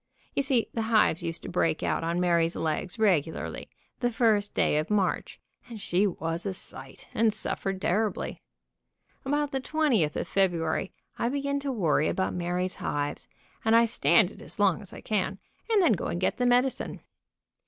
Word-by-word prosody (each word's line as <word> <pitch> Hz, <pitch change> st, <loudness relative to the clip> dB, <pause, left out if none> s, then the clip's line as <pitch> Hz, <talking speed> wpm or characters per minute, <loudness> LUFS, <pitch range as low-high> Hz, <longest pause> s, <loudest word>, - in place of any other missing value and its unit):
You -, -, +1 dB
see 265 Hz, -4 st, +1 dB
the 230 Hz, -, -1 dB
hives 220 Hz, -7 st, +3 dB
used 165 Hz, -1 st, -4 dB
to -, -, -6 dB
break 165 Hz, -3 st, 0 dB
out -, -, 0 dB
on 170 Hz, +1 st, 0 dB
Mary's 170 Hz, -1 st, +2 dB
legs 160 Hz, +5 st, -2 dB
regularly, 175 Hz, -8 st, 0 dB, 0.3 s
the 245 Hz, -, +1 dB
first 220 Hz, -3 st, +1 dB
day -, -, +2 dB
of 155 Hz, -, -3 dB
March, 200 Hz, -3 st, 0 dB, 0.3 s
and 230 Hz, -2 st, -7 dB
she 195 Hz, +1 st, +1 dB
was 165 Hz, -2 st, -3 dB
a 190 Hz, -, -2 dB
sight, -, -, -8 dB
and 225 Hz, -1 st, +3 dB
suffered 195 Hz, -2 st, -2 dB
terribly. 205 Hz, +2 st, -1 dB, 0.8 s
About 290 Hz, +1 st, 0 dB
the 270 Hz, -, -1 dB
2oth 260 Hz, -, +1 dB
of -, -, -2 dB
February 175 Hz, -3 st, 0 dB, 0.3 s
I 235 Hz, -, +1 dB
begin 280 Hz, +1 st, -1 dB
to 280 Hz, -1 st, -2 dB
worry 165 Hz, -, +2 dB
about 190 Hz, -, -1 dB
Mary's 180 Hz, +1 st, -2 dB
hives, 145 Hz, 0 st, -3 dB, 0.4 s
and 225 Hz, 0 st, +4 dB
I 230 Hz, 0 st, +6 dB
stand 225 Hz, -3 st, +3 dB
it -, -, -14 dB
as -, -, -6 dB
long 200 Hz, -4 st, +3 dB
as 200 Hz, -, -9 dB
I -, -, -10 dB
can, 195 Hz, -2 st, -1 dB, 0.3 s
and 440 Hz, -2 st, +4 dB
then 335 Hz, -, +5 dB
go 180 Hz, -, -2 dB
and 170 Hz, -, -2 dB
get 185 Hz, -, 0 dB
the 245 Hz, -, +2 dB
medicine. 250 Hz, +2 st, +1 dB
200 Hz, 180 wpm, -28 LUFS, 175-235 Hz, 0.8 s, I